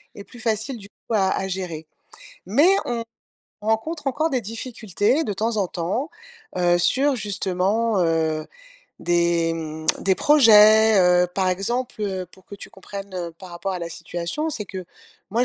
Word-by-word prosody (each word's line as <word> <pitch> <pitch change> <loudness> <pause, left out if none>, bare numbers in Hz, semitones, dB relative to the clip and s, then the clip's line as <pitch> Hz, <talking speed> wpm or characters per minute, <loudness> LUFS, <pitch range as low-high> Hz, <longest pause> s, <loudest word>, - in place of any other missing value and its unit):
et 200 - -9
plus 240 - -14
facile, 225 +3 -2
du 200 -2 -13
coup, 230 - -9
à 190 -2 +3
à 190 - -1
gérer. 180 -4 -5 0.6
Mais 285 - +4 0.2
on 235 -1 -2 0.6
on 210 - -7
rencontre 290 +7 -1
encore 310 +5 0
des 260 -4 0
difficultés, 225 - -1
de 205 - -2
temps 220 +3 -1
en 195 -3 +1
temps, 185 - -3 0.5
heu, 175 -1 +3
sur 270 +10 +2
justement, 200 +1 0
heu, 160 -2 0 0.5
des, 170 -1 +2
mmh, 155 -1 -6
des 190 - +2
projets, 220 -6 +6
heu, 180 0 +4
par 190 -1 +1
exemple, 220 +5 -2
heu, 190 -2 -3
pour 190 - -19
que 200 - -10
tu - - -10
comprennes, 195 0 -9
heu, 175 -2 -4
par 180 +2 -13
rapport 180 +3 -4
à 180 - -3
la 170 -1 -5
situation, 175 - -4
c'est 220 -8 -4
que 185 -2 -7 0.5
moi 235 +4 +2
200 Hz, 170 wpm, -23 LUFS, 180-230 Hz, 0.6 s, projets